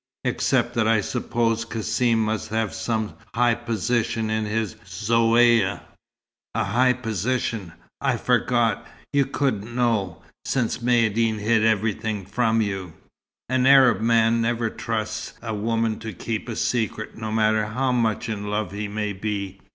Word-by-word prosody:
except 120 - +1
that 120 -3 +1
I 110 -1 +4
suppose 115 +1 -1
Cassim 115 0 0
must 110 0 -2
have 110 -1 -1
some 110 -1 -2 0.2
high 120 0 +4
position 115 -1 -1
in 110 0 0
his 110 -1 -2
Zaouïa." 115 +2 +3 0.7
"A - - +1
high 125 +5 +3
position! 115 -4 -2 0.3
I - - +1
forgot, 120 -2 +1 0.3
you 140 -2 +3
couldn't 120 -5 -2
know 110 -9 0 0.2
since 125 -3 -1
Maïeddine 115 -2 +2
hid 110 +1 +2
everything 110 -1 0
from 115 +2 +1
you. 95 -5 -3 0.5
An 130 +1 +2
Arab 130 -5 +6
man 115 0 +3
never 115 -1 0
trusts 110 -2 -4
a 115 -2 -5
woman 115 +1 -1
to 110 -1 -6
keep 110 +6 -4
a 115 - -3
secret, 110 -3 -2
no 110 -1 -5
matter 110 -1 +2
how 130 +5 0
much 115 -4 0
in 105 -2 -4
love 105 -3 -2
he 105 +1 -4
may 105 0 -3
be. 100 -1 -4
110 Hz, 145 wpm, -24 LUFS, 105-120 Hz, 0.7 s, Arab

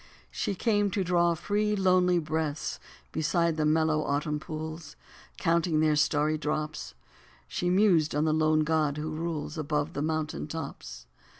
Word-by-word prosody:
She 200 - -2
came 205 0 +1
to 195 - +2
draw 175 -1 +2
free, 210 +5 0
lonely 185 -2 +3
breaths 155 -2 -2 0.3
beside 165 +1 +1
the 155 -1 +1
mellow, 155 0 +2
autumn 150 +1 -1
pools; 155 - -7 0.4
Counting 165 -1 +1
their 155 -1 +3
starry 150 +1 +2
drops. 150 0 -3 0.5
She 175 - -2
mused 180 -6 +3
on 150 +1 +2
the 155 - +2
lone 155 0 +3
god 155 -2 +1
who 155 +1 -3
rules 160 0 -4
Above 150 +1 -1
the 145 - -3
mountain 155 -1 -2
tops. 60 - -7
155 Hz, 145 wpm, -28 LUFS, 150-170 Hz, 0.5 s, lonely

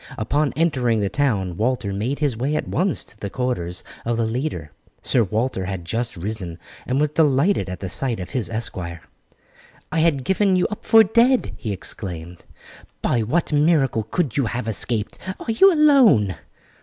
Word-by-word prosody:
Upon 145 +7 0
entering 130 -8 +1
the 100 -1 0
town 100 -11 0
Walter 115 -3 -1
made 115 +8 -2
his 145 -5 0
way 135 +6 -1
at - - -2
once 180 - 0
to 105 - -17
the 100 - -4
quarters 95 -8 -3 0.2
of 115 0 -1
the 115 - +1
leader. 110 - -3 0.3
Sir 120 - +3
Walter 110 -1 -1
had 95 -2 -5
just 115 +4 -2
risen, 90 -2 -5 0.3
and 130 +2 0
was 150 0 +2
delighted 150 - +2
at 90 -1 -6
the 95 - -3
sight 115 +5 0
of 90 - -7
his 125 -5 -2
esquire. 90 -7 -4 0.9
"I 160 - 0
had 155 -5 +2
given 190 +4 +2
you 180 - +2
up 210 - -7
for 225 0 +8
dead," 235 +5 +2
he 110 - -5
exclaimed. 90 -3 -7 0.6
"By 120 - +1
what 150 +9 0
miracle 145 -6 +3
could 125 +5 -2
you 135 -5 +2
have 120 0 -4
escaped? 110 0 -2 0.2
Are 230 - -3
you 385 - +6
alone?" 265 - +5
120 Hz, 175 wpm, -22 LUFS, 100-150 Hz, 0.9 s, for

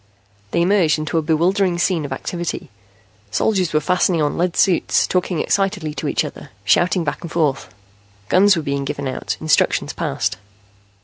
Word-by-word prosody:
They 170 - +1
emerged 180 -5 +3
into 155 +1 -1
a - - 0
bewildering 175 +4 +1
scene 175 -3 0
of 140 - -7
activity. 170 0 -4 0.6
Soldiers 185 - +1
were 155 - +2
fastening 180 +1 +1
on 150 -1 0
lead 175 0 -1
suits, 185 -4 +3
talking 180 -1 -1
excitedly 190 -6 0
to - - -4
each - - 0
other, - - -9 0.2
shouting 180 0 +3
back 145 -2 -3
and 170 - -7
forth. 150 - 0 0.6
Guns 195 - +5
were 165 - -2
being 140 -1 -2
given 140 0 -4
out, 130 - -3
instructions 155 -1 +1
passed. - - -2
170 Hz, 165 wpm, -20 LUFS, 150-180 Hz, 0.6 s, Guns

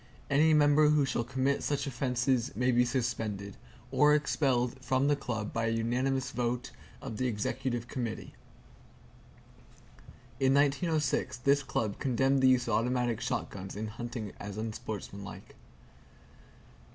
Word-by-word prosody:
Any 155 +3 +5
member 150 0 +5
who 150 -2 +4
shall 120 - -1
commit 135 +3 0
such 145 -2 -1
offenses 125 -1 0
may 125 +1 +2
be 125 0 +4
suspended, 115 -5 -2 0.4
or 150 +1 +5
expelled 130 -3 0
from 130 +1 +1
the 145 - +4
Club 110 -6 -4
by 115 0 0
unanimous 125 +4 0
vote 125 0 -2 0.3
of 110 - -5
the 130 - 0
Executive 120 +2 -2
Committee." 120 -3 -5 2.1
In 135 0 +3
1906, 145 0 +1
this 140 +3 +3
Club 110 -6 -2
condemned 135 +1 +2
the 130 - +6
use 125 -1 +3
of 115 - 0
automatic 120 0 0
shotguns 95 -1 -4
in 110 +1 -4
hunting 115 -1 -6
as 100 0 -7
unsportsmanlike. 105 -2 -6
125 Hz, 125 wpm, -30 LUFS, 115-135 Hz, 2.1 s, the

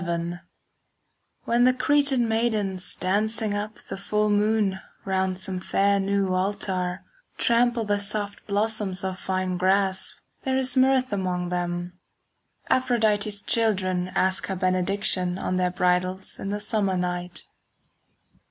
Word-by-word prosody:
XI 170 0 -3 1.0
When 235 +1 +2
the 255 0 +4
Cretan 275 -2 +3
maidens 215 -5 0
Dancing 215 +3 0
up 210 +1 -3
the - - -7
full 210 +1 0
moon 205 -2 +2 0.3
Round 190 -1 0
some 185 0 -3
fair 200 +2 +2
new 195 -1 0
altar, 185 -1 -1 0.3
Trample 235 0 +2
the 205 0 +1
soft 205 0 -2
blossoms 205 -2 0
of 190 -1 -3
fine 185 -1 -2
grass, 190 +1 +1 0.3
There 265 -1 0
is 260 -1 -1
mirth 260 -2 +3
among 180 -2 -1
them. 175 0 -3 0.7
5 - - +5
Aphrodite's 215 -4 0
children 185 -5 +1
Ask 190 0 +1
her 190 - -2
benediction 185 0 +1
On 185 - -2
their 180 0 +2
bridals 180 +1 0
in 195 - -4
the 205 +1 -2
summer 205 -3 0
night. 180 0 -3
195 Hz, 130 wpm, -25 LUFS, 185-215 Hz, 1.0 s, 5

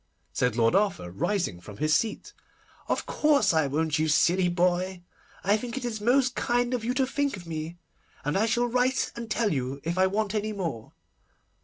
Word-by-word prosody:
said 125 -3 +1
Lord 115 +3 +3
Arthur, 190 - +1
rising 105 - -1
from 100 +2 -11
his 155 +5 +2
seat. 220 +4 -2 0.5
'Of - - -1
course 280 - +3
I 160 -3 +2
won't, 155 +2 0
you 155 - +2
silly 175 +4 +3
boy. 180 +1 0 0.4
I 200 +2 +3
think 240 +3 -6
it 260 - -4
is 220 -3 -3
most 255 +3 +3
kind 245 +1 0
of 245 -3 -1
you 245 +2 -1
to 265 0 +2
think 280 -2 -1
of 175 - -11
me, 160 +1 -5 0.5
and 145 - 0
I 215 +4 +2
shall 240 +2 +2
write 250 +2 +1
and 235 -1 -6
tell 220 -3 +1
you 135 0 -3
if 170 +3 -2
I 190 - +5
want 205 +1 -1
any 215 0 -1
more. 165 - -5
195 Hz, 195 wpm, -27 LUFS, 155-235 Hz, 0.5 s, I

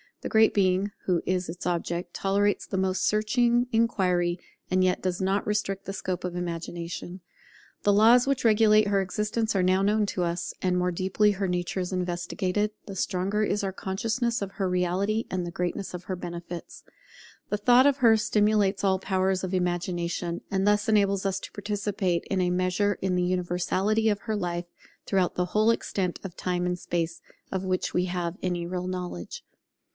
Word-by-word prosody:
The - - -4
Great 220 0 +5
Being, 190 0 +2
who 180 -3 +1
is 185 -1 -1
its 175 +2 -7
object, 175 0 -2
tolerates 200 +1 +1
the 190 - -3
most 190 0 0
searching 240 +3 +2
inquiry, 180 -6 +1 0.3
and 185 0 +2
yet 185 -1 +1
does 185 -1 -1
not 195 +2 +1
restrict 205 -2 -1
the 195 - -4
scope 185 -2 -3
of 180 -1 -4
Imagination. 175 +1 -5 0.6
The 205 - +4
laws 230 +4 +6
which 270 -2 0
regulate 215 -1 +5
her 200 -1 +2
existence 210 +3 -1
are 190 - +3
now 185 +1 +3
known 210 +2 +2
to 180 - -1
us; 170 0 -2
and 180 -1 +1
the - - +2
more 180 0 +1
deeply 190 +4 +2
her 195 -1 -2
nature 180 +1 -2
is 180 0 -3
investigated, 180 +3 -1 0.2
the 195 - -6
stronger 190 +3 0
is 205 -1 0
our 195 - -1
consciousness 225 +5 -1
of 195 - -6
her 190 -2 -1
reality 185 +5 0
and 185 - -1
of - - -4
the 170 - -5
greatness 180 +2 -3
of 180 0 -6
her 185 - -4
benefits. 175 -1 -7 0.7
The 210 - 0
thought 245 +5 +5
of 280 -1 +3
her 230 -4 +6
stimulates 210 -2 +2
all 190 -1 +2
the - - -18
powers 190 0 +1
of 185 0 -3
Imagination, 175 -1 -2
and 195 0 +1
thus 205 0 +3
enables 200 -2 +2
us 190 - -1
to - - -8
participate 205 -3 -2
in 190 -2 0
a 180 0 +1
measure 185 +3 +1
in 185 -1 0
the 180 - +1
universality 185 +4 +1
of 205 -1 -1
her 220 -2 -2
life, 175 -3 -2 0.4
throughout 190 -2 +1
the 180 - 0
whole 215 +1 +4
extent 190 -5 -2
of 185 -3 -7
Time 180 -1 -1
and 180 0 -1
Space 170 -1 -3 0.3
of 190 0 -2
which 185 -1 -1
we 180 - +2
have 175 -1 -3
any 175 -2 -1
real 180 0 -3
knowledge. 180 - -5
190 Hz, 190 wpm, -27 LUFS, 180-205 Hz, 0.7 s, laws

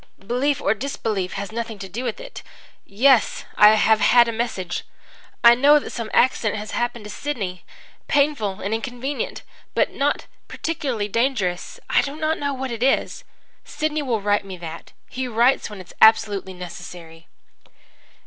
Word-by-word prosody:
'Belief 250 +7 -1
or 200 - +2
disbelief 215 -5 -3
has 200 +1 -5
nothing 230 -1 -5
to 195 - -7
do 225 +7 -5
with - - -3
it. - - -9 0.5
Yes, 245 +4 +3
I 210 +1 +7
have 220 0 +4
had 240 0 +5
a - - -1
message. 220 -6 -3 0.6
I 235 0 +9
know 285 +5 +6
that 295 - -4
some 230 -2 -5
accident 225 -4 +2
has 210 0 -6
happened 240 -2 -2
to 210 - -9
Sidney 205 -8 -4 0.4
painful 280 -10 +1
and 200 +3 -2
inconvenient 245 +4 -4 0.3
but - - +2
not 285 +1 0 0.2
particularly 265 -10 -3
dangerous. 215 -6 -1
I - - +3
do 280 +1 -5
not 315 +1 -1
know 285 -1 -1
what 265 -1 -4
it 230 -1 -5
is. 265 +2 +1 0.4
Sidney 305 +1 -2
will 240 -6 -1
write 205 0 +1
me 190 -2 -8
that. 165 -1 -9 0.2
He 260 0 -4
writes 240 +3 +2
when 210 -2 -9
it 185 - -10
is - - -16
absolutely 205 -4 +4
necessary.' 170 -2 -10
230 Hz, 165 wpm, -22 LUFS, 200-265 Hz, 0.6 s, I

